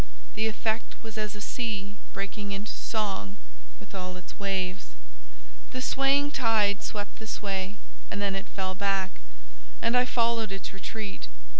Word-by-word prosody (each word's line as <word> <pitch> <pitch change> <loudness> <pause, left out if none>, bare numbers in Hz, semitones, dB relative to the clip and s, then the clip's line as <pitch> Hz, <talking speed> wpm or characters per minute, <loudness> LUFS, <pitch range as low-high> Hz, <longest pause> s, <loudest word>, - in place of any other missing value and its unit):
The 220 +1 +2
effect 220 +1 0
was 220 -1 -6
as 215 -1 -1
a 210 - -6
sea 205 -4 -1 0.2
breaking 200 +1 -2
into 200 +2 -2
song 195 - -1 0.4
with - - -12
all 185 -1 -3
its 180 - -9
waves. 190 - 0 0.8
The 255 - -1
swaying 275 +2 +4
tide 220 -6 +4
swept 205 -1 -3
this 220 0 -3
way, 195 -1 -1 0.3
and 205 - -2
then 200 -1 +2
it 195 0 -2
fell 190 -1 -1
back, 195 -1 +2 0.7
and 230 - +3
I 250 0 +7
followed 230 -3 +3
its 195 0 -3
retreat. 200 - -4
205 Hz, 150 wpm, -30 LUFS, 195-225 Hz, 0.8 s, I